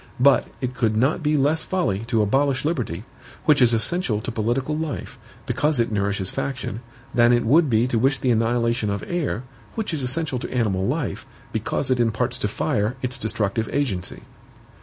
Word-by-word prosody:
But 140 +2 +5
it 125 -1 -2
could 110 -3 0
not 130 +9 +2
be 150 0 +2
less 145 +4 +2
folly 165 - 0
to 115 -3 +2
abolish 135 +5 +1
liberty, 120 - -2 0.4
which 150 -3 +4
is 120 -2 +6
essential 115 - +1
to 125 - -4
political 120 +6 -1
life, 155 -2 -4 0.3
because 150 -3 +1
it 115 -1 +1
nourishes 100 -2 0
faction, 125 -6 -3 0.3
than 120 -1 +5
it 120 -1 +3
would 150 +6 +4
be 115 0 +3
to 125 -3 0
wish 135 +3 +2
the 130 - +1
annihilation 115 -1 +1
of 100 0 -2
air, 160 -9 -2 0.3
which 220 -6 -3
is 150 - -2
essential 130 +1 -1
to - - -6
animal 100 -6 0
life, - - -2 0.3
because - - -1
it 125 - +2
imparts 120 +2 0
to - - 0
fire 105 +2 -1
its 130 +1 -3
destructive 110 0 -1
agency. 120 -11 -2
125 Hz, 180 wpm, -23 LUFS, 110-140 Hz, 0.4 s, is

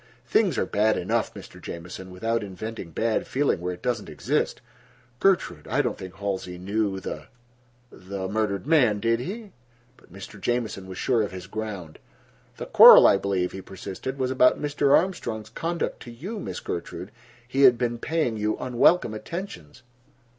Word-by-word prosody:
"Things - - +2
are - - +1
bad 110 +1 +2
enough, - - -1
Mr. - - -11
Jamieson, 90 +2 -8
without 115 +6 -1
inventing 100 0 -7
bad 110 +7 -1
feeling 140 -9 0
where 90 0 -3
it 90 - -21
doesn't 125 -1 -2
exist. - - -1 0.6
Gertrude, 170 - +1
I - - +1
don't - - -1
think 95 -1 -9
Halsey 95 -3 -4
knew 100 +1 -1
the—the 120 -5 -9
murdered 100 -1 -1
man, 130 -10 +3
did 115 +1 +1
he?" 205 - -6 0.5
But - - -23
Mr. 100 +2 -10
Jamieson 115 -4 -2
was 95 -1 -8
sure 120 -4 +1
of 105 - -2
his 90 -2 -8
ground. 100 -6 -6 0.6
"The - - -5
quarrel, - - +10
I 100 - +6
believe," 95 -2 -1
he 95 - -7
persisted, 95 +8 -7
"was 130 -1 -1
about 125 -1 +4
Mr. 145 -1 +3
Armstrong's 115 - -3
conduct 170 +7 -3
to - - -9
you, 190 - -6
Miss - - -5
Gertrude. 90 +3 -6 0.4
He 135 +2 -1
had 125 -3 +7
been 120 -1 -1
paying 150 -6 -1
you 105 0 -1
unwelcome 125 +1 +3
attentions." 115 - -7
110 Hz, 160 wpm, -25 LUFS, 95-125 Hz, 0.6 s, quarrel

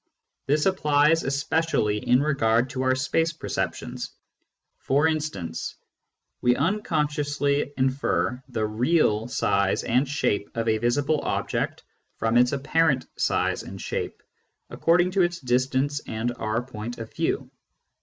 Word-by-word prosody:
This 150 +2 +2
applies 155 -4 +3
especially 140 -6 0
in 125 +5 +3
regard 125 -4 +2
to 130 - -3
our 130 0 +2
space 160 +5 +1
perceptions. 155 - -4 0.7
For 140 +3 +2
instance, 145 - -3 0.7
we 125 0 +4
instinctively 145 -7 0
infer 130 -1 0
the 110 -3 -1
"real" 110 0 +2
size 100 -6 +1
and 125 +4 +2
shape 105 -8 0
of 115 0 -1
a 110 -1 +2
visible 140 +6 +1
object - - -2 0.3
from 115 +1 0
its 125 +1 +5
apparent 140 -1 +1
size - - 0
and - - -9
shape, - - -4 0.5
according 175 +2 +3
to 190 +1 +2
its 175 -1 +1
distance 130 +3 +1
and 115 +2 -2
our 110 +1 -2
point 120 -1 -7
of 115 -1 -8
view. - - -1
130 Hz, 125 wpm, -25 LUFS, 115-150 Hz, 0.7 s, its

